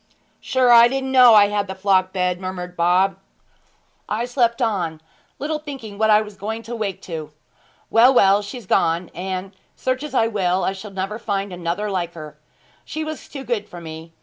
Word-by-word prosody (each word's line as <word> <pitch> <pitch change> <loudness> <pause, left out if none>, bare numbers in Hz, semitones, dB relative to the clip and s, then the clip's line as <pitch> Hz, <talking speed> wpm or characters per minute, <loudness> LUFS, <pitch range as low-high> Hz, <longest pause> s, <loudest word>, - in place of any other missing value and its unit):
'Sure 255 -2 +2
I 235 0 +9
didn't 265 +1 -3
know 250 -3 +8
I 205 -1 +6
had 205 -1 -1
the 190 - -6
flock 190 -1 +2
bed,' 180 -1 -1
murmured 180 -1 -6
Bob. 180 +3 +2 0.9
'I 230 +3 -1
slept 240 -2 +1
on, 185 -10 -1 0.4
little 305 +2 -3
thinking 260 -9 -9
what 220 0 +3
I 210 0 +6
was 210 -1 -11
going 220 +3 -5
to 235 +2 -6
wake 205 -4 -4
to. 160 -4 -6 0.6
Well, 235 +3 +6
well, 200 -5 +5
she's 210 +3 -8
gone; 170 -1 +1
and 190 +1 -5 0.2
search 255 0 -2
as 295 -3 -6
I 225 - +4
will 190 -4 0
I 190 - 0
shall 195 +2 -9
never 195 +3 -4
find 200 -3 -3
another 175 +4 -3
like 175 -3 -2
her! 155 -2 -9 0.5
She 315 0 -5
was 310 0 -7
too 275 -2 -7
good 220 -5 -3
for 175 - -9
me. 160 0 -9
200 Hz, 190 wpm, -21 LUFS, 185-235 Hz, 0.9 s, I